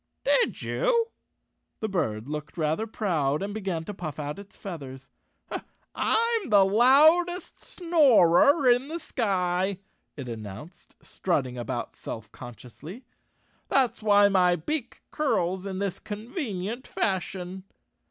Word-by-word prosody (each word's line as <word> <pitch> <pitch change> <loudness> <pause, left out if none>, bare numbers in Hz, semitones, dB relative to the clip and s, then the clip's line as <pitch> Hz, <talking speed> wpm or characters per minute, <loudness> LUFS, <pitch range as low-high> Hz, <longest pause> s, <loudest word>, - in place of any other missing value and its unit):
"Did - - +2
you?" 470 -2 +1 0.7
The 220 - -2
bird 115 - -2
looked 150 +2 -6
rather 160 +7 0
proud 160 -9 -1
and 205 +1 -4
be¬ 220 - -4
gan 180 -4 -2
to 205 - -6
puff 165 -7 -6
out 150 +3 -5
its 200 0 -13
feathers. 140 -8 -8 0.8
"I'm 460 - +1
the 200 -2 +6
loudest 310 - +4
snorer 285 - +4
in 245 +2 +4
the 325 +3 -4
sky," 190 - -1 0.4
it 135 -3 -6
announced, 115 - -9
strutting 135 -9 -2
about 120 0 -4
self 110 -1 -8
con 120 -2 -10
ciously. 165 - -11 0.3
" - - -40
That's 260 -5 +2
why 205 -1 +5
my 180 -3 +3
beak 245 - -4
curls 190 - 0
in 190 -1 -4
this 200 -1 -3
convenient 220 - -5
fashion." 190 -1 -3
195 Hz, 130 wpm, -27 LUFS, 160-245 Hz, 0.8 s, the